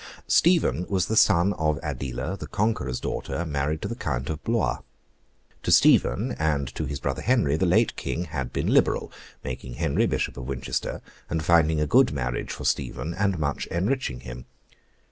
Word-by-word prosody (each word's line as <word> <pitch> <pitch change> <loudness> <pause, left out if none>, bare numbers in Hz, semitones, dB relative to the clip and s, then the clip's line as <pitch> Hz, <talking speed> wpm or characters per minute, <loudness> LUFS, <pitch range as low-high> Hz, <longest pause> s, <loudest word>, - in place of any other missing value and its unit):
Stephen 165 - +3
was 95 -3 +1
the 110 - -2
son 90 -1 +4
of 75 -1 +1
Adela, 65 +8 -3
the - - -8
Conqueror's 100 - -1
daughter, 85 - -3
married 75 0 -2
to - - -1
the - - -4
Count 65 - -3
of 80 0 -6
Blois. 115 -1 0 0.8
To - - -1
Stephen, 120 +6 +4
and 75 -4 0
to - - -3
his 70 -2 -4
brother 70 -1 -2
Henry, 115 - +2
the 80 - +1
late - - +3
King 85 - -3
had 70 -7 -4
been - - -2
liberal; - - +2 0.3
making 65 -1 -6
Henry 80 0 +1
Bishop - - -2
of 60 - -6
Winchester, 65 -2 -3 0.3
and 80 -2 -2
finding 80 -2 +4
a 75 - +2
good 125 - +4
marriage 60 -3 -3
for - - -6
Stephen, 85 - -1
and 100 0 0
much 75 -2 -2
enriching 95 - -1
him. - - -9
80 Hz, 175 wpm, -25 LUFS, 70-95 Hz, 0.8 s, son